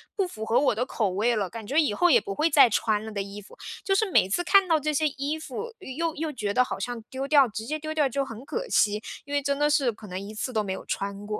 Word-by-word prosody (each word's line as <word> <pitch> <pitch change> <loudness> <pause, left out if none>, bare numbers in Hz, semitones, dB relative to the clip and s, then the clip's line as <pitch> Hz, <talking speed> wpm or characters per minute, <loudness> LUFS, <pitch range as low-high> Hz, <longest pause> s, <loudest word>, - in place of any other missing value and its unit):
不 390 -3 0
符 220 -10 -7
合 225 - +3
我 275 -5 +2
的 245 +3 -1
口 220 -6 -1
味 215 +6 +1
了， 200 -4 -1
感 225 -1 -8
觉 275 +8 -2
以 250 -9 0
后 355 +10 +3
也 475 - +6
不 395 - -5
会 315 +2 +2
再 280 -6 +7
穿 215 0 0
了 220 - -7
的 200 -2 -3
衣 200 +1 -9
服， 205 - -16 0.3
就 390 +1 +1
是 425 +1 +2
每 - - +4
次 350 - 0
看 395 0 +5
到 325 -2 +3
这 305 0 -1
些 310 +2 +2
衣 290 +2 -3
服， 375 - -6
又 320 +5 -3
又 315 0 -3
觉 210 -6 -3
得 250 - +4
好 - - -5
像 245 -2 -4
丢 265 +1 -4
掉， 280 -3 +6
直 220 0 -6
接 310 +5 -3
丢 310 +1 -5
掉 300 -3 +2
就 275 +2 -1
很 255 -1 -9
可 485 +11 -4
惜， 210 - +2 0.2
因 285 - -7
为 285 - +2
真 280 0 -1
的 295 +1 +2
是 275 -4 +2
可 220 -1 -13
能 185 0 -5
一 200 +2 -8
次 220 +4 -4
都 215 -2 +1
没 195 - -4
有 - - -8
穿 200 +1 -4
过。 210 0 -4
265 Hz, 320 characters per minute, -26 LUFS, 215-310 Hz, 0.3 s, 再